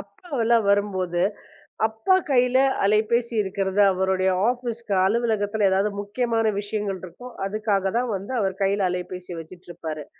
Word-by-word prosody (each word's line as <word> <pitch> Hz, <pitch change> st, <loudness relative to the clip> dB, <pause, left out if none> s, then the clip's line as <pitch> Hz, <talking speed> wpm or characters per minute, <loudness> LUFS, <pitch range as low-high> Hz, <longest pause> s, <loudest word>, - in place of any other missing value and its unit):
அப்பா 360 Hz, -, -16 dB, 0.2 s
எல்லாம் 230 Hz, -1 st, +3 dB
வரும்போது, 185 Hz, -4 st, 0 dB, 0.6 s
அப்பா 220 Hz, -, +1 dB, 0.2 s
கையில 250 Hz, 0 st, +3 dB, 0.3 s
அலைபேசி 220 Hz, +4 st, +2 dB
இருக்கிறது. 195 Hz, 0 st, -1 dB
அவருடைய 190 Hz, 0 st, +1 dB, 0.2 s
ஆபிஸ் 240 Hz, -2 st, -3 dB, 0.2 s
அலுவலகத்தில் 215 Hz, -1 st, +1 dB
ஏதாவது 195 Hz, +2 st, +2 dB
முக்கியமான 225 Hz, +1 st, 0 dB
விஷயங்கள் 205 Hz, -2 st, -3 dB
இருக்கும். 245 Hz, +8 st, -10 dB
அதுக்காகத்தான் 210 Hz, +3 st, 0 dB
வந்து 200 Hz, +7 st, -6 dB
அவர் 190 Hz, -1 st, -2 dB
கையில 195 Hz, -1 st, +2 dB
அலைபேசி 180 Hz, -1 st, -6 dB
வச்சிட்டு 175 Hz, +3 st, -13 dB
இருப்பாரு. 160 Hz, -3 st, -6 dB
205 Hz, 125 wpm, -24 LUFS, 190-225 Hz, 0.6 s, எல்லாம்